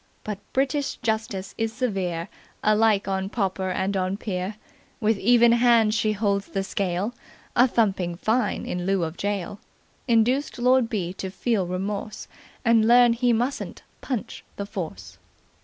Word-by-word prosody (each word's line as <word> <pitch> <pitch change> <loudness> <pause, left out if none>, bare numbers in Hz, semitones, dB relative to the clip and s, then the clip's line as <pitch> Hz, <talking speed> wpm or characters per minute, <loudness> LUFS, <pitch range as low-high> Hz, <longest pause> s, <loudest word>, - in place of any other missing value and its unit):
But 210 -2 -4
British 275 +2 0
Justice 220 -4 -2
is 225 0 0
severe 195 -9 -2 0.4
alike 215 -1 +3
on 190 0 -1
pauper 190 -3 -1
and 190 +2 -1
on 185 +1 -1
peer; 190 -1 -3 0.4
with 220 -3 +1
even 235 +1 +5
hand 235 -2 +4
she 215 0 +1
holds 200 -1 0
the 195 -1 -2
scale; 195 +3 -2 0.4
a 245 +2 +6
thumping 195 -7 0
fine, 220 +4 0
in 180 0 -3
lieu 195 -2 +2
of 160 0 -3
gaol, 200 0 -3 0.5
induced 245 +5 +2
Lord 250 -1 +3
B. 185 -6 -2
to 190 0 -5
feel 195 0 -1
remorse 200 +4 -4 0.4
and 230 -2 +4
learn 240 0 +6
he 245 +1 +2
mustn't 245 +4 -2 0.2
punch 255 -6 -4
the 200 - -4
Force." 95 - -7
210 Hz, 145 wpm, -25 LUFS, 190-235 Hz, 0.5 s, a